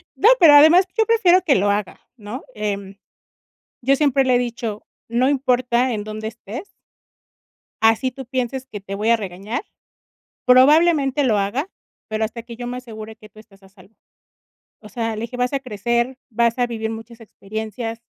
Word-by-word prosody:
No, 440 Hz, -, +5 dB
pero 330 Hz, -5 st, +8 dB
además 315 Hz, +6 st, +7 dB
yo 445 Hz, -, +4 dB
prefiero 400 Hz, -6 st, +4 dB
que 280 Hz, -, +4 dB
lo 200 Hz, +2 st, +2 dB
haga, 205 Hz, -2 st, -2 dB, 0.2 s
¿no? 215 Hz, +4 st, -8 dB
Eh. 200 Hz, -2 st, -4 dB, 0.8 s
Yo 270 Hz, +3 st, +3 dB
siempre 275 Hz, -2 st, +2 dB
le 255 Hz, -1 st, +2 dB
he -, -, +5 dB
dicho, 230 Hz, -3 st, -4 dB, 0.3 s
no 245 Hz, +3 st, +2 dB
importa 255 Hz, -2 st, +1 dB
en 210 Hz, -2 st, -3 dB
dónde 215 Hz, +1 st, -6 dB
estés 230 Hz, -, -9 dB, 1.0 s
así 225 Hz, +4 st, +3 dB
tú 265 Hz, 0 st, -10 dB
pienses 255 Hz, +1 st, -3 dB
que 215 Hz, -6 st, -8 dB
te 195 Hz, 0 st, -7 dB
voy 210 Hz, +3 st, 0 dB
a 235 Hz, -, +5 dB
regañar, 200 Hz, -, -5 dB, 0.8 s
probablemente 285 Hz, +2 st, +4 dB
lo 225 Hz, -6 st, +2 dB
haga, 240 Hz, -, -2 dB, 0.4 s
pero 220 Hz, 0 st, -2 dB
hasta 230 Hz, +1 st, -5 dB
que 235 Hz, 0 st, -10 dB
yo 245 Hz, +1 st, -6 dB
me 250 Hz, +1 st, -4 dB
asegure 220 Hz, -3 st, -9 dB
que 215 Hz, -1 st, -16 dB
tú 215 Hz, -, -17 dB
estás 200 Hz, -3 st, -20 dB
a 190 Hz, -, -18 dB
salvo. 195 Hz, +2 st, -21 dB, 0.9 s
O 210 Hz, -, -13 dB
sea, 225 Hz, -2 st, -3 dB
le 215 Hz, -, -6 dB
dije, 245 Hz, +2 st, -6 dB
vas 250 Hz, +2 st, -1 dB
a 275 Hz, -, 0 dB
crecer, 240 Hz, +1 st, -2 dB
vas 235 Hz, 0 st, +1 dB
a 245 Hz, -, +2 dB
vivir 220 Hz, -2 st, -4 dB
muchas 225 Hz, +1 st, -9 dB
experiencias, 220 Hz, +2 st, -6 dB
235 Hz, 180 wpm, -21 LUFS, 215-260 Hz, 1.0 s, pero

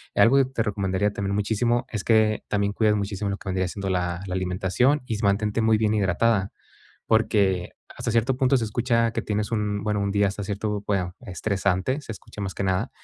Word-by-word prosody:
eh, -, -, +3 dB
algo 130 Hz, +4 st, +6 dB
que 135 Hz, -, +5 dB
te 130 Hz, -3 st, -2 dB
recomendaría 100 Hz, -1 st, 0 dB
también 100 Hz, 0 st, -2 dB
muchísimo 115 Hz, +4 st, +1 dB
es 105 Hz, -3 st, -3 dB
que 110 Hz, -1 st, +3 dB
también 100 Hz, -1 st, 0 dB
cuides 105 Hz, 0 st, +2 dB
muchísimo 100 Hz, 0 st, -2 dB
lo 100 Hz, -, -3 dB
que 100 Hz, -, -8 dB
vendría 95 Hz, -1 st, 0 dB
siendo 100 Hz, +1 st, -4 dB
la 90 Hz, -1 st, -1 dB
la 90 Hz, -, -3 dB
alimentación 95 Hz, +10 st, +1 dB
y 115 Hz, -, -3 dB
s 105 Hz, -, -5 dB
mantente 105 Hz, +2 st, +1 dB
muy 110 Hz, 0 st, +4 dB
bien 110 Hz, -1 st, +2 dB
hidratada, 100 Hz, +1 st, +1 dB, 0.6 s
porque, 100 Hz, -5 st, +2 dB, 0.3 s
hasta 115 Hz, -, -2 dB
cierto 120 Hz, +3 st, +2 dB
punto 130 Hz, +1 st, +3 dB
se 115 Hz, -, 0 dB
escucha 115 Hz, +1 st, +1 dB
que 115 Hz, -, -1 dB
tienes 105 Hz, +1 st, -2 dB
un 105 Hz, -2 st, -1 dB
bueno, 105 Hz, -1 st, 0 dB
un 100 Hz, 0 st, -1 dB
día 100 Hz, 0 st, +3 dB
hasta 100 Hz, +1 st, -5 dB
cierto 105 Hz, +1 st, -3 dB
bueno 90 Hz, -3 st, -1 dB
estresante, 100 Hz, -, -1 dB
se 130 Hz, -, -7 dB
escucha 105 Hz, -, -11 dB
más 95 Hz, -2 st, -4 dB
que -, -, -3 dB
nada, 95 Hz, -1 st, 0 dB
105 Hz, 210 wpm, -25 LUFS, 95-115 Hz, 0.6 s, algo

